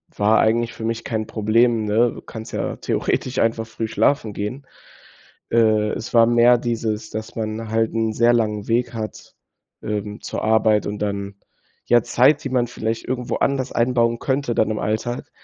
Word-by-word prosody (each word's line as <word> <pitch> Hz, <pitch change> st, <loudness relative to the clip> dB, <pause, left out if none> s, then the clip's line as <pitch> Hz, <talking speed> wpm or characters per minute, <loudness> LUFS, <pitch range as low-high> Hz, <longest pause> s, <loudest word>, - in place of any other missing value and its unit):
war 105 Hz, +2 st, +3 dB
eigentlich 115 Hz, +1 st, +1 dB
für 110 Hz, -, -6 dB
mich 115 Hz, 0 st, -2 dB
kein 110 Hz, -2 st, -2 dB
Problem, 110 Hz, +1 st, +2 dB
ne? 115 Hz, +3 st, +2 dB
Du -, -, -10 dB
kannst 110 Hz, -1 st, -9 dB
ja -, -, -2 dB
theoretisch 130 Hz, -, -1 dB
einfach 115 Hz, 0 st, +1 dB
früh 110 Hz, 0 st, -4 dB
schlafen 115 Hz, -1 st, +1 dB
gehen. 115 Hz, +8 st, -5 dB, 0.8 s
Äh, 110 Hz, -2 st, +3 dB
es 115 Hz, -, -6 dB
war 115 Hz, -1 st, +6 dB
mehr 120 Hz, +1 st, +5 dB
dieses, 115 Hz, -2 st, -3 dB
dass 110 Hz, 0 st, -6 dB
man 110 Hz, 0 st, -4 dB
halt 115 Hz, +1 st, 0 dB
'n 110 Hz, -1 st, 0 dB
sehr 120 Hz, +2 st, +4 dB
langen 105 Hz, -3 st, 0 dB
Weg 120 Hz, +1 st, 0 dB
hat, 110 Hz, -3 st, -7 dB, 0.5 s
ähm, 105 Hz, 0 st, -4 dB
zur -, -, -5 dB
Arbeit 110 Hz, -1 st, +3 dB
und 105 Hz, 0 st, -4 dB
dann 100 Hz, -1 st, -3 dB, 0.5 s
ja 120 Hz, -2 st, +4 dB
Zeit, 145 Hz, +5 st, +3 dB
die 135 Hz, -, -3 dB
man 125 Hz, -2 st, +1 dB
vielleicht 115 Hz, -1 st, -4 dB
irgendwo 125 Hz, -1 st, -3 dB
anders 135 Hz, -1 st, 0 dB
einbauen 115 Hz, -1 st, +1 dB
könnte, 135 Hz, -2 st, -1 dB
dann 110 Hz, -, +2 dB
im 110 Hz, -, -2 dB
Alltag, 110 Hz, +3 st, -3 dB
115 Hz, 175 wpm, -21 LUFS, 110-120 Hz, 0.8 s, war